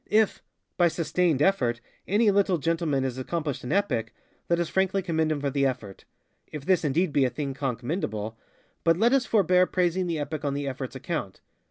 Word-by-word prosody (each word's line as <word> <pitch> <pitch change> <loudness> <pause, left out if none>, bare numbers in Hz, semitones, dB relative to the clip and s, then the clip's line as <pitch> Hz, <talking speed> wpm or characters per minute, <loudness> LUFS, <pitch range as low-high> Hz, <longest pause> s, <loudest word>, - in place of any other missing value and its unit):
If, 215 0 +2 0.4
by 175 - +5
ŌĆ£sustained 165 -2 +1
effort, 125 -12 +2
ŌĆØ - - -37 0.3
any 210 +2 +4
little 195 -2 +2
gentleman 160 -3 0
has 130 -1 -3
accomplished 150 +1 -3
an 125 - -4
epic, 120 - 0 0.3
let 170 0 +2
us 170 - 0
frankly 190 +2 +1
commend 160 -3 0
him 150 - -1
for 140 -1 -1
the 140 0 +1
effortŌĆöif 125 +4 -7
this 185 -2 +3
indeed 155 +3 +1
be 140 - +4
a 130 - +3
thing 135 +2 -4
conk 130 -3 -3
mendableŌĆöbut 110 - -3 0.6
let 230 +8 +3
us 270 -2 +2
forbear 185 -4 +4
praising 180 0 0
the 165 -2 -1
epic 150 0 -4
on 140 -1 -1
the 145 0 -2
effortŌĆÖs 130 -1 -5
account. 130 - -4
155 Hz, 190 wpm, -26 LUFS, 135-180 Hz, 0.6 s, by